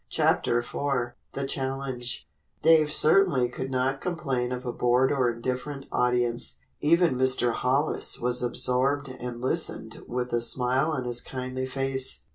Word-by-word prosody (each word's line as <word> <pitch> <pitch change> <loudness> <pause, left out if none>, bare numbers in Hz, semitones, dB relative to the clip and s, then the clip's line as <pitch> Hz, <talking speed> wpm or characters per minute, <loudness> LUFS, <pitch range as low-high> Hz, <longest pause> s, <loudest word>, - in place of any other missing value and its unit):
CHAPTER 120 - +1
IV 120 0 -2 0.2
THE 140 - -2
CHALLENGE 135 -2 -2 0.4
Dave 155 -1 +5
certainly 155 -6 +3
could 130 +2 -5
not 130 +1 -1
complain 135 -9 -2
of 125 0 -5
a 120 - -3
bored 125 +2 +2
or 130 -4 +2
indifferent 130 +4 -4
audience. 120 -1 0 0.2
Even 170 +1 +3
Mr. 130 -1 +3
Hollis 135 +6 +1
was 125 +1 0
absorbed 130 +3 +2
and 125 -2 -7
listened 130 -4 -1
with 125 0 -3
a 120 - +2
smile 125 +5 +2
on 145 -5 -2
his 120 -1 -2
kindly 130 0 -5
face. 135 0 0
130 Hz, 140 wpm, -26 LUFS, 125-135 Hz, 0.4 s, Dave